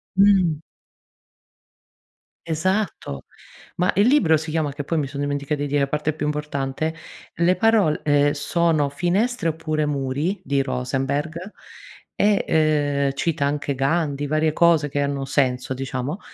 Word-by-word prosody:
Mh. 190 -5 +4 1.9
Esatto! 165 - -2 0.5
Ma 180 +1 +2
il 200 +3 +4
libro 210 - +4
si 160 +1 -6
chiama, 155 -2 0
che 145 +1 -5
poi 165 +3 -2
mi 145 -3 0
son 140 +1 -7
dimenticata 145 +1 -2
di 145 - -1
dire 145 0 +1
a - - 0
parte 150 +2 -1
più 150 - -4
importante, 150 +1 -2 0.4
"Le 175 +2 +3
parol 200 -6 +3
ehm, 145 -1 +3
sono 155 0 +1
finestre 175 - 0
(oppure 155 -1 -2
muri)" 145 +6 -2
di 140 -2 +1
Rosenberg 135 +4 -2 0.8
e, 205 0 +2
ehm, 145 -3 +2
cita 145 0 -1
anche 140 -1 -1
Gandhi 145 +1 0
varie 155 +1 +1
cose 165 -3 +3
che 145 +1 -1
hanno 140 -1 -2
senso, 130 -2 0
diciamo, 135 +5 -4
150 Hz, 140 wpm, -22 LUFS, 140-165 Hz, 1.9 s, Mh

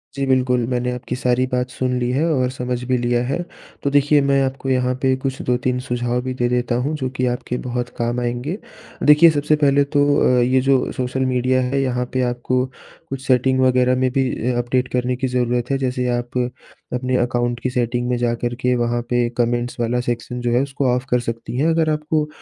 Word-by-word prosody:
जी 140 0 -1
बिल्कुल 125 -2 +2
मैंने 125 0 -1
आपकी 125 0 -4
सारी 125 0 +1
बात 125 0 -1
सुन 125 0 -1
ली 120 0 -1
है 140 +5 +1
और 130 -3 +1
समझ 125 -1 -3
भी 130 -1 +2
लिया 120 0 +1
है 140 +7 -1 0.4
तो 140 - +1
देखिए 145 +1 +4
मैं 140 0 +3
आपको 135 0 -3
यहाँ 125 -1 +1
पे 130 -1 +3
कुछ 135 -1 -2
2-3 125 +1 0
सुझाव 120 0 -1
भी 130 +1 -3
दे 120 -1 0
देता 125 0 0
हूँ 155 +2 -1
जो 130 -3 -2
कि 130 - +1
आपके 125 0 -2
बहुत 125 0 -2
काम 120 +1 -1
आएँगे। 125 +8 -2 0.5
देखिए 150 +3 +7
सबसे 150 0 +2
पहले 145 -1 +3
तो 145 0 +5 0.3
अ, - - +4
ये 130 +2 +3
जो 135 0 +2
सोशल 130 +1 -2
मीडिया 130 0 +1
है 135 +2 0
यहाँ 125 -1 -1
पे 130 - +1
आपको 125 +1 -1 0.4
कुछ 135 -1 -5
सेटिंग 130 +1 +3
वग़ैरह 130 0 +3
में 130 0 +1
भी 130 0 +1 0.2
अ - - -2
अपडेट 125 +1 0
करने 125 0 0
की 130 +1 -2
ज़रूरत 125 -1 0
है 135 - +2
जैसे 125 -1 -1
आप 120 +1 -5 0.6
अपने 125 +1 -1
अकाउंट 120 -1 0
की 130 - -2
सेटिंग 120 0 -1
में 125 - +1
जाकर 120 0 -1
के 125 0 +1
वहाँ 120 0 0
पे 120 -1 +2
कमेंट्स 120 0 -1
वाला 120 +1 0
सेक्शन 120 0 -3
जो 120 -1 0
है 120 +2 +3
उसको 140 -1 -2
ऑफ 125 +1 -3
कर 125 - +3
सकती 115 +1 -5
हैं 145 +5 +2
अगर 160 -1 +2
आपको 150 0 0
125 Hz, 215 wpm, -20 LUFS, 120-130 Hz, 0.6 s, देखिए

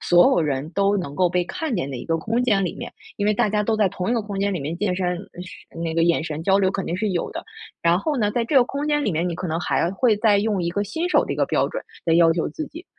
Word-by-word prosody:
所 175 0 +5
有 - - +3
人 145 0 -2
都 200 +3 +2
能 175 -7 -4
够 180 +3 +3
被 180 0 0
看 300 - -3
见 140 -7 -2
的 135 - -5
一 120 - -7
个 165 - +1
空 230 +8 -1
间 205 -6 +2
里 175 - -3
面， - - -7 0.3
因 205 - -1
为 210 - +3
大 210 - +2
家 210 0 +1
都 220 +1 0
在 210 -2 +3
同 185 +1 -3
一 - - +2
个 230 - 0
空 205 -1 -5
间 200 0 +1
里 - - -2
面 150 +4 -3
健 185 0 0
身， 180 -1 -1 0.3
是 185 -2 -13
那 165 -1 -3
个 165 - +2
眼 170 -1 +2
神 155 -1 -4
交 195 +3 +3
流 190 -1 +2
肯 195 -1 -3
定 170 - -2
是 210 +2 -1
有 175 -2 -2
的。 335 - -6 0.4
然 170 +1 +3
后 295 +9 -1
呢， 210 -4 +1
在 240 - 0
这 275 +4 0
个 250 - +7
空 280 +3 -4
间 295 -1 +1
里 205 - 0
面， 165 +3 0
你 170 - -3
可 180 +2 -4
能 160 0 -1
还 175 - 0
会 220 +3 +2
再 210 -1 +3
用 205 -3 0
一 170 - -1
个 200 +4 -1
新 320 - -3
手 - - +4
的 - - -2
一 - - -5
个 - - +2
标 - - +1
准， - - -5 0.2
来 165 - +3
要 165 -1 +5
求 165 0 -1
自 310 - -5
己。 330 +5 -11
195 Hz, 340 characters per minute, -23 LUFS, 170-215 Hz, 0.4 s, 个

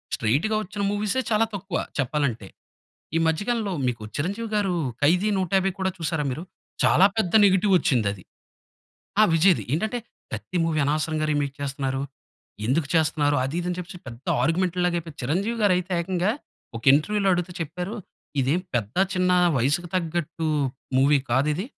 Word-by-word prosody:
స్ట్రెయిట్‌గా 150 - +1
వచ్చిన 200 +1 -6
మూవీసే 210 +4 0
చాలా 215 +1 +4
తక్కువ 185 -3 -3 0.2
చెప్పాలంటే. 130 -6 -1 0.7
ఈ - - +4
మధ్య 160 +3 +1
కాలంలో 225 -5 0
మీకు 120 -3 -2
చిరంజీవి 200 +10 -2
గారు 200 -4 +1 0.3
'ఖైదీ 180 +8 +3
నూట 185 -3 -1
యాబై' 190 0 0
కూడా 190 - +1
చూసారా 160 -2 -1
మీరు? 140 +6 -4 0.4
చాలా 190 - +6
పెద్ద 200 -6 0
నెగెటివ్ 195 0 +4
వచ్చిందది. 105 - 0 1.0
ఆ! - - +8
విజయ్‌ది. 170 +2 +4
ఏంటంటే 220 +8 -1 0.3
ప్రతి 110 - -5
మూవీ 160 -1 0
అనవసరంగా 155 +1 0
రీమేక్ 145 -2 0
చేస్తున్నారు. 135 -1 -2 0.6
ఎందుకు 140 +5 +1
చేస్తున్నారు? 150 -2 +2
అది 135 +6 -3
ఇది 175 - -5
అని 175 - -3
చెప్పేసి 180 0 -7
పెద్ద 120 +2 -11 0.2
ఆర్‌గ్యుమెంట్‌ 175 +4 +1
లాగా 175 -1 +1
అయిపోయి, 165 -2 -9
చిరంజీవి 195 - -1
గారయితే 185 -2 +2
ఏకంగా 185 +3 0 0.5
ఒక 115 - -7
ఇంటర్వ్యూలో 195 +8 +2
అడుగుతే 180 0 -1
చెప్పారు, 180 +6 -4 0.5
"ఇదేం 140 +7 +1
పెద్ద 110 -2 -1 0.2
చిన్న 180 0 +2 0.2
వయసుకి 145 +8 +1
తగ్గట్టు 165 -2 -2 0.5
మూవీ 140 +2 +5
కాదిది. 150 - +1
165 Hz, 150 wpm, -24 LUFS, 145-190 Hz, 1.0 s, ఆ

